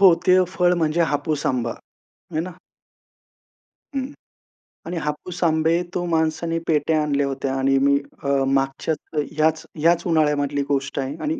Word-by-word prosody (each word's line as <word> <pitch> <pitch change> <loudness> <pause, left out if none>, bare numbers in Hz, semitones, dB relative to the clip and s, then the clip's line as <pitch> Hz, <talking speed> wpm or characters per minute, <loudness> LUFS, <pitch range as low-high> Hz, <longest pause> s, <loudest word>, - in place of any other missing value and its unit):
हो 190 -4 +8
ते 185 0 +6 0.2
फळ 180 -1 +3
म्हणजे 160 +2 +2
हापूस 150 0 -1
आंबा, 120 -4 0 0.6
है 155 - +1
ना. 180 +2 -5 1.4
हं. 270 +1 -2 0.7
आणि 170 +2 -4
हापूस 165 +4 -4
आंबे 160 +1 +3
तो 175 - -1
माणसाने 165 0 0
पेट्या 155 0 +2
आणल्या 145 -1 +1
होत्या 135 0 -2
आणि 135 0 +2
मी 140 +1 +4 0.3
अ, 140 - -3 0.2
मागच्या 135 +3 0 0.4
ह्याच 160 0 +1
ह्याच 170 +2 +3
उन्हाळ्यामधली 150 -3 +2
गोष्ट 140 -1 -1
आहे 135 +1 -3
आणि 310 0 -1
155 Hz, 140 wpm, -22 LUFS, 140-170 Hz, 1.4 s, हो